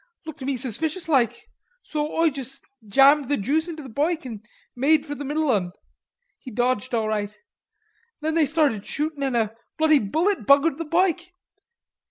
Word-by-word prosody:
lookter 285 -4 -7
me 275 - 0
suspiciouslike, 265 - 0 0.4
so 300 0 -3
Oi 330 -1 +2
jus' 270 0 -7 0.3
jammed 275 +5 +5
the 290 - +1
juice 305 - 0
into 320 -3 -7
the - - -9
boike 310 +6 -1
and 220 -4 -7 0.3
made 295 +4 +3
for 290 - -5
the 290 - -6
middle 295 +1 0
'un. 180 -5 -1 0.7
He 260 - -10
dodged 245 +1 -1
all 220 -2 0
right. 210 -1 -3 0.8
Then 315 +1 -2
they 320 -2 +3
started 285 -9 +1
shootin' 300 +3 -2
and 265 -3 0
a 220 -1 -1 0.2
bloody 310 -2 +4
bullet 320 - -1
buggered 280 +2 +4
the 330 - -3
boike.... 350 +2 +1
285 Hz, 165 wpm, -24 LUFS, 245-315 Hz, 0.8 s, jammed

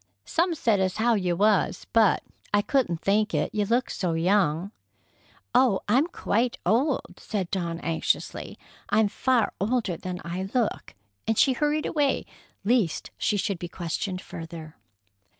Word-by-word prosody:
"Some 340 0 +1
said 225 -9 +2
as 190 +1 0
how 235 +2 +3
you 185 -5 +1
was, 205 +2 +2
but 225 -4 +4 0.3
I 205 0 +3
couldn't 200 - 0
think 210 +2 +1
it. - - 0
You 210 -1 +1
look 240 +5 +1
so 180 -4 -1
young." 175 +1 +1 0.8
"Oh, 245 -6 +4
I'm 255 +10 +3
quite 240 -7 0
old," 260 +6 +1
said 195 -5 -3
Dawn 170 -4 -2
anxiously. 165 -1 -2 0.3
"I'm 210 0 +3
far 255 +1 +1
older 215 -5 0
than 180 +1 -5
I 185 +3 -4
look." 240 -4 -1 0.3
And 225 - +1
she 265 - +5
hurried 300 +3 0
away, 290 -3 +1 0.4
lest 220 -7 +1
she 210 - +1
should 195 -2 -1
be 175 - -5
questioned 180 +2 -3
further. 165 -1 -9
205 Hz, 150 wpm, -26 LUFS, 180-240 Hz, 0.8 s, she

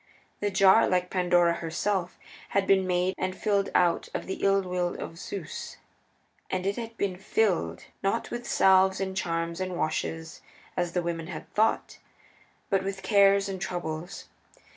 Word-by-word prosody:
The 205 - 0
jar, 195 +2 +5
like 180 -1 0
Pandora 175 -2 +3
herself, 170 +3 -2 0.3
had 200 -1 +1
been 190 -1 +3
made 180 +1 +1
and 185 0 -2
filled 200 -2 +1
out 175 -2 +2
of - - -3
the 190 - -5
ill 195 0 +3
will 180 -1 -2
of 165 - -7
Zeus. 180 -5 -6 0.7
And 185 0 -2
it 200 +1 0
had 230 -1 -7
been 190 -2 -1
filled, 185 - 0 0.2
not 195 +4 -1
with 240 0 -5
salves 190 0 +4
and 190 -1 -3
charms 170 -1 -2
and 185 -1 -3
washes, 160 0 -3 0.3
as 175 -1 -1
the 180 - 0
women 165 -1 -3
had - - -7
thought, 220 +1 +1 0.7
but 195 -1 +2
with 195 0 -4
Cares 200 -1 +4
and 190 -2 -5
Troubles. 175 0 -4
185 Hz, 160 wpm, -27 LUFS, 175-195 Hz, 0.7 s, jar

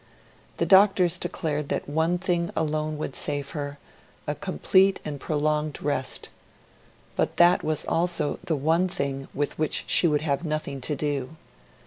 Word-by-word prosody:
The - - +1
doctors 190 -3 +5
declared 150 -3 -2
that - - -2
one 160 +4 +1
thing 175 -2 0
alone 155 -1 -1
would 145 -3 -5
save 145 -1 -1
her 145 -2 -5 0.5
a - - -1
complete 190 - +2
and 145 -2 -5
prolonged 150 0 -1
rest. 140 -3 -2 0.9
But - - -1
that 175 +1 +6
was 155 -1 -1
also 170 -3 0
the 160 - 0
one 160 +6 +2
thing 140 -7 -3
with 145 +1 -2
which 155 - +1
she 175 - +4
would 150 -2 +1
have 145 0 -1
nothing 155 -4 -3
to 150 +4 -2
do. 145 0 -3
155 Hz, 150 wpm, -26 LUFS, 145-170 Hz, 0.9 s, that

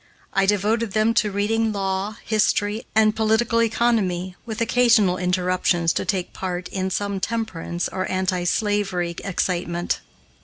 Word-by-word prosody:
I 195 0 +2
devoted 210 +2 +1
them 220 +1 +3
to 210 - -2
reading 215 +3 0
law, 195 +1 -2
history, 210 0 +1
and 215 -1 +4
political 225 +1 +2
economy, 210 -6 +1
with 220 -1 -4
occasional 230 -6 +3
interruptions 180 -2 +1
to - - -2
take 185 -3 -2
part 180 -1 -4
in 190 -1 -2
some 200 +1 -2
temperance 185 -5 -3
or 185 0 -3
anti 185 -1 -1
slavery 195 -3 0
excitement. 175 -2 -1
200 Hz, 130 wpm, -23 LUFS, 185-220 Hz, -, and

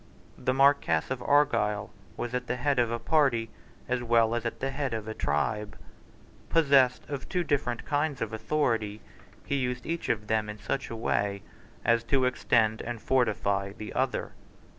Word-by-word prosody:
The - - -1
Marquess 135 - +3
of 130 - -2
Argyle 130 -8 +2 0.3
was 120 - -3
the 125 0 -2
head 135 +1 +1
of 120 -1 +2
a 115 - -1
party 125 -6 +2 0.4
as 125 0 0
well 115 -1 +3
as 120 - 0 0.2
the 135 +1 -2
head 135 -4 -2
of 110 -1 -5
a 110 - -3
tribe. 105 +7 -1 0.7
Possessed 140 -6 +4
of 140 -3 -6
two 180 -1 0
different 130 -6 -1
kinds 145 -2 0
of 115 -1 -3
authority, 110 -3 0 0.5
he 140 - 0
used 125 -2 -2
each 170 0 -3
of 105 -1 0
them 110 0 0
in 105 - -6
such 105 +7 -3
a 115 - -5
way 100 -3 -1 0.4
as 115 -1 +3
to 130 +1 +2
extend 115 -3 +2
and 120 0 -5
fortify 100 -6 +1
the 110 -1 -8
other. - - -1
120 Hz, 165 wpm, -28 LUFS, 110-135 Hz, 0.7 s, Possessed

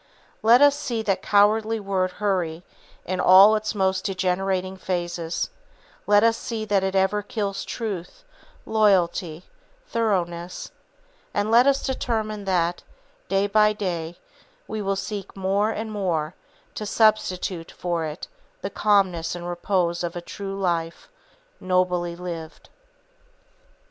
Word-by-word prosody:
Let 235 +5 +6
us 285 -1 +6
see 250 -6 -3
that 195 -3 0
cowardly 215 +2 +3
word 190 -2 -1
Hurry 180 -5 -1 0.4
in 185 0 -2
all 195 +4 +8
its 215 +1 -2
most 190 -1 +1
degenerating 185 0 -1
phases, 175 -2 -3 0.6
let 205 +1 +5
us 230 0 +4
see 225 -2 -4
that 200 -2 +1
it 190 0 -1
ever 190 +2 +2
kills 200 -2 -3
truth, 215 - -5 0.4
loyalty, 180 -6 +2 0.4
thoroughness; 180 - -2 0.6
and 205 +2 0
let 240 +3 +6
us 275 -1 +2
determine 220 -5 -2
that, 175 -2 0 0.5
day 195 +1 +2
by 210 +1 +4
day, 175 -5 -4 0.5
we 215 - -4
will 195 -1 0
seek 195 0 -6
more 195 +3 +1
and 220 0 -4
more 175 -6 -1 0.4
to 210 - -5
substitute 185 -6 +1
for 170 -2 -2
it 155 +1 -6 0.4
the - - -3
calmness 185 -6 +1
and 175 0 -6
repose 175 -1 -1
of 170 0 -3
a - - -3
true 195 +2 -6
life, 170 -3 -2 0.5
nobly 180 -2 0
lived. 170 -2 -8
195 Hz, 130 wpm, -24 LUFS, 175-210 Hz, 0.6 s, all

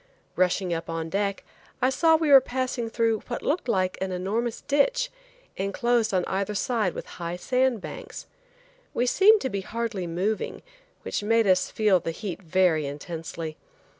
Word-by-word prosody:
Rushing 185 0 +1
up 165 0 -4
on 165 0 -3
deck, 200 0 -1 0.4
I 255 - +2
saw 320 +4 +4
we 315 -2 +1
were 270 -1 +10
passing 255 -2 -2
through 225 -1 +1
what 240 - -4
looked 300 -1 -1
like 185 -5 0
an 190 0 -1
enormous 215 +6 -2
ditch, - - +1 0.5
enclosed 235 +3 +1
on 185 -2 +1
either 200 +2 -2
side 215 -5 0
with - - -5 0.2
high 170 +1 -3
sand 250 +3 +1
banks. - - -8 0.7
We 245 - +2
seemed 400 - +5
to 260 - -1
be 200 - -2
hardly 220 -3 -3
moving, 190 +6 -2 0.4
which - - -2
made 225 +2 +3
us 185 -1 +3
feel 210 -4 +3
the 165 - -4
heat 180 +3 -5
very 170 -4 +2
intensely. 160 +2 -6
205 Hz, 165 wpm, -26 LUFS, 180-245 Hz, 0.7 s, were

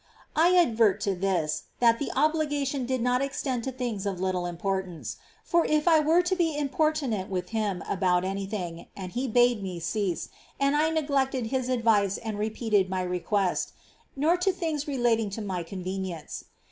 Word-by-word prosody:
I 345 +4 +5
adverted 225 - +4
to 200 -2 +1
this, 180 -5 -1
that 230 -1 +4
the 285 - -2
obligation 290 -3 +1
did 255 -2 0
not 250 +1 +2
extend 270 -3 -2
to 265 - -2
things 240 -6 -3
of 190 -3 -3
little 185 -1 -1
importance, 185 0 -3 0.2
— - - -25
as 340 - +6
if 305 +2 +2
I 325 -2 +7
were 320 +4 +4
to 365 +1 +1
be 330 -5 0
impor 295 +2 +2
tunate 230 -11 -3
with 185 -2 -3
him 210 -5 -1
about 180 -1 +1
any 195 +1 -3
thing, 175 -5 -5
and 185 -2 -6
he 250 +5 -2
bade 245 -1 +3
me 185 -3 -4
cease, 185 0 -2 0.3
and 275 +1 +2
I 305 +2 +3
neglected 275 -6 0
his 255 -1 0
advice 225 -5 +2
and 220 -2 -5
repeated 215 -2 +1
my 185 -1 -1
request, 180 +1 -1 0.2
— - - -33
nor 315 +6 +3
to 360 +2 +2
things 320 -5 -3
relating 240 -6 +1
to - - -3
my 185 -3 -2
convenience. 185 -1 -5
225 Hz, 185 wpm, -27 LUFS, 190-280 Hz, 0.3 s, I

